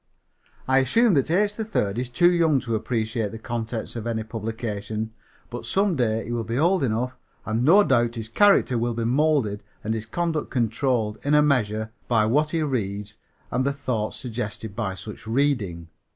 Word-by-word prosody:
"I 130 +1 +4
assume 215 - +3
that 140 -2 +2
H. 205 +5 +2
3rd 210 - -1
is 125 0 -3
too 175 +9 +4
young 165 -5 +3
to 115 -2 -3
appreciate 110 -1 -1
the 115 - -7
contents 115 0 -4
of 115 -1 -4
any 110 -1 -1
publication, 110 -1 -4 0.4
but 120 - -5
some 195 -2 +1
day 115 -4 0
he 120 - -6
will 120 -1 -1
be 115 +2 -3
old 175 +5 +3
enough, 125 +1 -1 0.3
and 110 +2 0
no 190 +9 +7
doubt 120 -6 +2
his 110 -2 -4
character 130 - +4
will 120 0 -1
be 115 - -2
molded 130 -5 +2 0.2
and 110 - -1
his 110 -1 -4
conduct 165 +2 -2
controlled, 115 -2 0
in 145 +1 +2
a 150 - +6
measure, 110 -6 +1 0.2
by 110 -3 +3
what 150 +7 +2
he 160 -1 0
reads 105 -6 -3 0.3
and 125 +2 +1
the 140 +1 0
thoughts 125 -6 -2
suggested 110 -4 -5
by 105 -5 -2
such 105 +2 -9
reading. 110 -10 0
120 Hz, 180 wpm, -24 LUFS, 110-140 Hz, 0.4 s, no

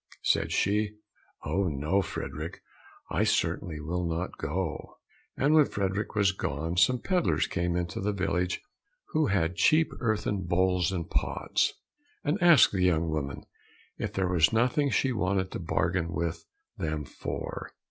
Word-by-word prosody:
Said - - +2
she, 105 +1 +1 0.5
"Oh, 95 +6 +1
no, 80 +6 +1
Frederick, - - -6 0.5
I - - +2
certainly 80 -3 0
will 85 +4 -2
not 85 +2 -2
go." 80 +2 -3 0.4
And 145 +3 +3
when 155 -2 +7
Frederick 100 +2 -2
was 100 -2 +4
gone 80 -2 -3
some 125 +9 +5
pedlars 185 -3 +2
came 85 -2 -1
into 90 +1 -2
the 105 +2 0
village 90 -2 -1 0.5
who 155 -2 +2
had 90 -4 +1
cheap 160 +1 +4
earthen 105 -4 0
bowls 90 0 +1
and 85 -3 -3
pots, - - 0 0.5
and 160 +7 0
asked 170 -6 +7
the 95 - -1
young 85 -3 +2
woman 70 -3 -3 0.6
if - - -2
there 95 -1 0
was 85 -3 +4
nothing 125 +5 +2
she 135 0 +1
wanted 95 -4 0
to - - -4
bargain 85 0 0
with 85 0 -3 0.3
them 75 -2 -2
for? - - -5
90 Hz, 145 wpm, -28 LUFS, 85-105 Hz, 0.6 s, when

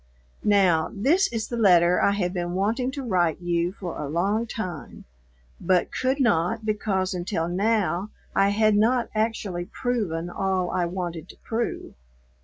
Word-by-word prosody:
Now, 190 -6 +3
this 315 - +2
is 225 -2 -3
the 240 - -4
letter 180 -5 +5
I 200 - +3
have 180 -3 -1
been 175 -1 -3
wanting 225 +7 0
to 280 -1 -5
write 180 -8 +1
you 175 0 0
for 185 -3 -7
a 145 - -4
long 200 +8 0
time, 180 -10 -6 0.5
but 180 -2 +1
could 260 +2 0
not 220 -2 +1
because 200 -3 -1
until 175 -2 -2
now 195 0 0 0.3
I 195 0 +4
had 215 +1 +3
not 235 +3 +2
actually 215 -5 -2
proven 190 -9 -2
all 185 0 -1
I 180 - 0
wanted 175 -2 -5
to - - -13
prove. 230 +1 -3
195 Hz, 155 wpm, -25 LUFS, 175-220 Hz, 0.5 s, letter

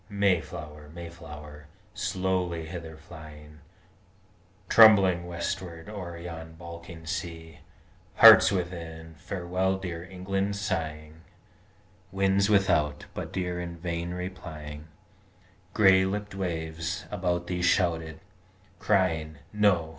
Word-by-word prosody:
Mayflower, 85 -7 -1
Mayflower, 75 -3 -10 0.3
slowly 90 -3 -1
hither 80 -1 -8
flying, 75 -2 -13 1.1
Trembling 95 -6 +7
westward 85 -1 -5
o'er 90 -5 -7
yon 80 -1 -8
balking 85 0 -10
sea, 80 -3 -5 0.6
Hearts - - +9
within 85 -3 -4
Farewell 95 +2 -1
dear 85 -3 -5
England 95 +2 -2
sighing, 80 -5 -4 0.9
Winds 95 +1 +2
without 95 -8 +2
But - - -6
dear 90 -1 -2
in 85 -1 -6
vain 85 0 -3
replying, 80 -5 -7 0.9
Gray 95 -3 +6
lipp'd 105 +2 -3
waves 85 0 -3
about 90 -3 -1
thee 90 0 -3
shouted, 80 -3 +1 0.6
crying 80 -6 +1 0.2
"No! 100 -6 +3
85 Hz, 95 wpm, -28 LUFS, 80-95 Hz, 1.1 s, Hearts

